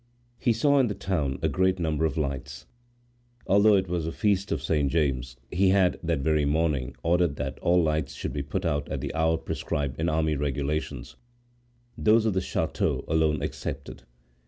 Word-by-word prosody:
He 125 - +2
saw 140 +5 +3
in 130 - +3
the 105 - -3
town 75 -9 -1
a - - +3
great 95 0 +1
number 80 -2 0
of 80 - -2
lights. 70 -2 -4 0.8
Although 100 +2 +5
it 95 -1 +1
was 85 -2 -2
the 80 - -2
feast 100 0 0
of - - 0
Saint 75 -3 +1
James, 65 -6 -1
he 95 +2 +3
had, 95 -2 +3
that 85 -4 -1
very 75 +1 +2
morning, 75 -3 0
ordered 85 -3 +2
that 65 -2 -4
all 90 0 +3
lights 75 -2 -1
should - - -4
be 70 - -2
put 90 +8 -3
out 75 -3 -1
at - - -3
the - - -4
hour 80 +1 +2
prescribed 70 -3 -3
in 80 - 0
the - - +1
army 80 -1 +1
regulations, 70 -1 -3 0.8
those 110 +1 +3
of 110 - +2
the 95 - 0
chateau - - -1
alone 80 -2 +1
excepted. 75 - -5
80 Hz, 185 wpm, -27 LUFS, 70-95 Hz, 0.8 s, Although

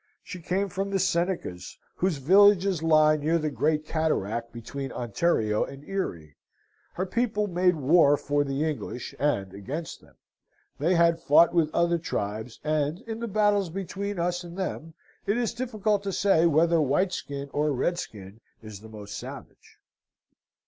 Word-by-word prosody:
She 180 - -8
came 190 +4 -1
from 195 +1 -3
the 195 - 0
Senecas, 175 - -2 0.2
whose 180 -4 0
villages 190 +3 +4
lie 155 -1 +4
near 155 +3 +1
the 155 -2 -2
great 155 +1 0
cataract 115 -8 -1
between 135 +4 -6
Ontario 115 -2 0
and 140 +1 -9
Erie; 85 - -4 0.6
her 185 - -2
people 210 +1 0
made 180 -1 +2
war 145 0 +4
for 145 +1 0
the 140 +2 -1
English, 125 -4 -5
and 100 -10 0
against 135 - -6
them: - - -22 0.6
they 170 +6 +2
had 170 -1 +3
fought 165 +3 +5
with 165 -3 +2
other 170 0 +1
tribes; 110 -6 -4
and, 155 +3 -1
in 225 -1 -6
the 235 - -3
battles 205 -3 +2
between 195 +3 -4
us 175 +1 -1
and 175 +1 -10
them, 165 -4 -4 0.3
it 205 - +1
is 240 -3 -1
difficult 215 -4 -1
to 200 -1 -3
say 180 -3 +3
whether 165 +2 +3
whiteskin 140 -2 -1
or 150 +1 +1
redskin 115 - -4 0.2
is 105 -2 -9
most 105 -2 -9
savage. - - -10
165 Hz, 150 wpm, -26 LUFS, 140-185 Hz, 0.6 s, fought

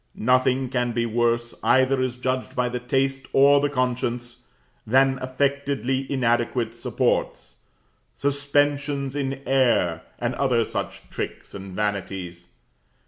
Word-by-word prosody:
Nothing 130 +2 +2
can 125 -2 -1
be 115 0 0
worse, 120 +1 0
either 130 0 +3
as 130 -1 -1
judged 130 +1 -3
by 125 0 +1
the 125 0 -3
taste 135 +2 -1
or 140 +1 +6
the 145 - +1
conscience, 125 -2 -2 0.4
than 130 +3 +3
affectedly 135 0 -1
inadequate 120 -2 0
supports 90 - -1 0.6
suspensions 140 0 0
in 135 -1 -3
air, 120 -11 +2 0.2
and 120 +1 -2
other 120 -3 +1
such - - -5
tricks - - -6
and 95 -1 -8
vanities. 95 -4 -3
130 Hz, 120 wpm, -24 LUFS, 120-135 Hz, 0.6 s, or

